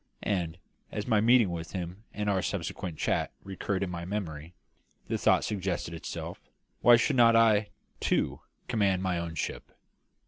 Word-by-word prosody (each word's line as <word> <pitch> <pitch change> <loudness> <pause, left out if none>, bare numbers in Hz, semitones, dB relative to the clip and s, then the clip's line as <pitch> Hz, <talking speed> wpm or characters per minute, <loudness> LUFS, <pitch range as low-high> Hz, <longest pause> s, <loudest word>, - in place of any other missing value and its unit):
And, 90 -5 -1 0.3
as 105 - -3
my 110 -4 +3
meeting 115 -4 +5
with 85 -1 -5
him 90 +3 -5
and 105 0 -3
our 95 -2 +2
subsequent 85 -3 -3
chat - - 0
recurred 95 0 -3
to 100 - 0
my 85 -1 -5
memory, 85 -4 -5 0.5
the - - -1
thought - - +4
suggested 95 -4 -2
itself, 80 - -6 0.4
"Why 120 +1 +8
should 130 +4 +2
not 115 -1 +7
I, 110 -2 +4 0.3
too, - - 0 0.3
command 100 -5 +1
my 90 -2 0
own 85 -1 -4
ship?" - - -4
95 Hz, 160 wpm, -29 LUFS, 85-105 Hz, 0.5 s, Why